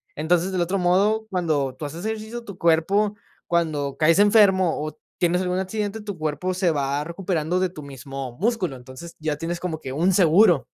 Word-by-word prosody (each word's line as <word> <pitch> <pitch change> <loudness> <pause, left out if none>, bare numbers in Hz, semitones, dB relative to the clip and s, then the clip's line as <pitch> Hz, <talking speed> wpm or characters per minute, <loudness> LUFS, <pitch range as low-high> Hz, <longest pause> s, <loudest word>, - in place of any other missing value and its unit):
Entonces, 175 +4 +1
del 185 -2 0
otro 185 +3 0
modo, 195 +5 +2
cuando 155 -8 0
tú 155 - -5
haces 165 +7 -7
ejercicio, 220 +2 -4
tu 200 -4 -9
cuerpo, 195 +6 +2 0.3
cuando 155 -5 0
caes 165 +4 +4
enfermo 200 -5 +4
o 155 - -6 0.2
tienes 175 +1 +2
algún 180 0 -1
accidente, 205 +3 -3
tu 205 -4 -6
cuerpo 155 +4 -2
se 180 -2 +1
va 140 -1 -1
recuperando 170 0 -2
de 185 0 +1
tu 155 -4 -10
mismo 135 -2 -7
músculo. 205 - 0
Entonces, 130 +7 -11
ya 155 -1 -1
tienes 170 +2 -4
como 165 -3 -4
que 130 - -6
un 170 +8 +2
seguro. 175 - +5
175 Hz, 185 wpm, -23 LUFS, 155-190 Hz, 0.3 s, seguro